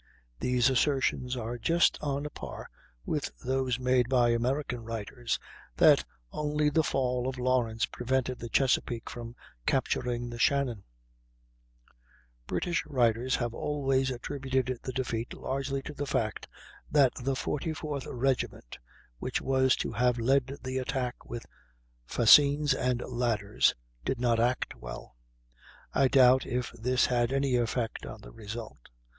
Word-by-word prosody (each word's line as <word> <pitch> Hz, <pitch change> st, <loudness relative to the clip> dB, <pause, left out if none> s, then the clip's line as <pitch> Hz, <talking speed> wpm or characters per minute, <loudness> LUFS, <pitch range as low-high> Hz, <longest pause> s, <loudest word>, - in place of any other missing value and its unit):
These 125 Hz, +1 st, +2 dB
assertions 130 Hz, -1 st, +1 dB
are 120 Hz, +1 st, -4 dB
just 170 Hz, +8 st, +3 dB
on 145 Hz, 0 st, -2 dB
a 150 Hz, -, -5 dB
par -, -, -8 dB, 0.3 s
with -, -, -1 dB, 0.2 s
those 130 Hz, -1 st, 0 dB
made 125 Hz, -1 st, +2 dB
by 125 Hz, -2 st, +4 dB
American 125 Hz, +1 st, -1 dB
writers, 115 Hz, +1 st, -3 dB, 0.4 s
that -, -, +6 dB, 0.3 s
only 150 Hz, 0 st, 0 dB
the 160 Hz, -, +4 dB
fall 125 Hz, -3 st, 0 dB
of 130 Hz, 0 st, -3 dB
Lawrence 125 Hz, -3 st, +1 dB
prevented 130 Hz, 0 st, -2 dB
the 120 Hz, -, -6 dB
Chesapeake 120 Hz, -2 st, +1 dB
from 120 Hz, 0 st, -8 dB, 0.3 s
capturing 120 Hz, -1 st, 0 dB
the 120 Hz, -, -7 dB
Shannon. 130 Hz, -6 st, +1 dB, 1.6 s
British 170 Hz, -2 st, -1 dB
writers 125 Hz, -2 st, +2 dB
have 120 Hz, -2 st, -2 dB
always 135 Hz, -1 st, 0 dB
attributed 130 Hz, -1 st, -2 dB
the 130 Hz, -, -4 dB
defeat 120 Hz, -2 st, -3 dB
largely 135 Hz, 0 st, -3 dB
to 150 Hz, -, -7 dB
the 145 Hz, 0 st, -4 dB
fact 110 Hz, -5 st, -1 dB, 0.4 s
that 140 Hz, -4 st, +4 dB
the 135 Hz, +2 st, 0 dB
44th 150 Hz, 0 st, -3 dB
regiment, 130 Hz, -, -2 dB, 0.4 s
which -, -, -2 dB
was 130 Hz, 0 st, +3 dB
to -, -, -3 dB
have 125 Hz, 0 st, +2 dB
led 135 Hz, +3 st, +1 dB
the 130 Hz, 0 st, -2 dB
attack 130 Hz, -1 st, -3 dB
with 120 Hz, -1 st, -6 dB, 0.6 s
fascines 140 Hz, -, +6 dB
and 125 Hz, -2 st, 0 dB
ladders, 110 Hz, -4 st, +1 dB, 0.3 s
did 130 Hz, -, -2 dB
not 120 Hz, -2 st, +2 dB
act 125 Hz, +2 st, +1 dB
well. -, -, -9 dB, 0.8 s
I 135 Hz, -, +4 dB
doubt 130 Hz, -1 st, +6 dB
if 125 Hz, -1 st, -2 dB
this 125 Hz, +2 st, +1 dB
had 120 Hz, -1 st, +1 dB
any 135 Hz, -1 st, +1 dB
effect 120 Hz, -1 st, -1 dB
on 110 Hz, -, -9 dB
the -, -, -12 dB
result. 110 Hz, -, -8 dB
125 Hz, 135 wpm, -29 LUFS, 120-135 Hz, 1.6 s, that